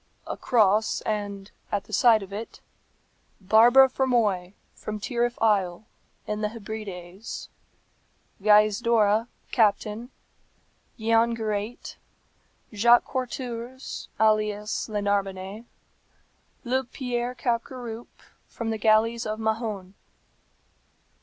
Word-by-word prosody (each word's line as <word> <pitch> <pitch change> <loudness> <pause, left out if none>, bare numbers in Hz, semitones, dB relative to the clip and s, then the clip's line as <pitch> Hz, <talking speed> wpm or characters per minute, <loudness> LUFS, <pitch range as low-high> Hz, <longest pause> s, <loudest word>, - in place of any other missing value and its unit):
A - - -4
cross, 215 -3 +2
and 205 -2 -4 0.2
at 205 - -1
the 215 - -14
side 225 -1 +5
of 195 0 -11
it, 220 +3 -7 0.8
Barbara 235 +7 +6
Fermoy, 220 -9 0 0.2
from 215 0 -6
Tyrryf 240 +2 -1
Isle, 200 -3 +1 0.4
in 210 0 -3
the 210 - 0
Hebrides; 210 -3 -7 0.9
Gaizdorra, 215 +1 +4 0.2
Captain; 215 +1 +1 0.9
Giangirate; 225 -1 0 0.8
Jacques 235 +3 +5
Quartourze, 255 -1 -5
alias 215 0 +1
le 210 -1 -2
Narbonnais; 200 +1 -2 1.0
Luc 255 0 -1
Pierre 245 -1 -2
Capgaroupe, 240 -1 -4 0.2
from 225 -1 -4
the 220 - -3
galleys 225 +2 +3
of 215 +1 -3
Mahon." 220 -4 -2
220 Hz, 90 wpm, -26 LUFS, 205-235 Hz, 1.0 s, Barbara